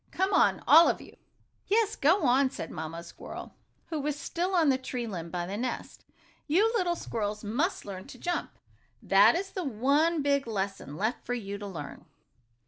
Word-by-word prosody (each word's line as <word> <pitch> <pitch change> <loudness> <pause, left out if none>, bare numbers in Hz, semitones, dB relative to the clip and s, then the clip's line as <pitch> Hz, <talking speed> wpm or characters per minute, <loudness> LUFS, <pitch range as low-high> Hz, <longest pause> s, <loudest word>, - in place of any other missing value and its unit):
Come 380 +2 0
on, - - +3
all 330 +1 +8
of - - -1
you!" - - -14 0.5
"Yes, 435 +1 +2
go 335 +6 +3
on!" 265 +1 +4
said 165 - -7
Mamma 160 +2 -6
Squirrel, 170 - -9 0.4
who 315 - -2
was 295 0 -2
still 360 +5 -2
on 325 -4 +4
the 260 -1 +2
tree 250 -2 -4
limb 175 -6 -5
by 175 0 -3
the 195 +3 -4
nest. 250 +3 -5 0.4
"You 405 +9 +3
little 355 -5 +1
squirrels 210 -7 -4
must 275 - -1
learn 190 -2 -7
to - - -11
jump. 350 +8 -3 0.5
That 200 +4 +6
is 380 +2 -3
the 370 - -4
one, 285 +5 +2
big 280 -2 +1
lesson 195 -8 -4
left 220 +6 -1
for 245 - -2
you 200 -3 -5
to 205 - -6
learn." 165 -7 -8
255 Hz, 185 wpm, -29 LUFS, 200-335 Hz, 0.5 s, all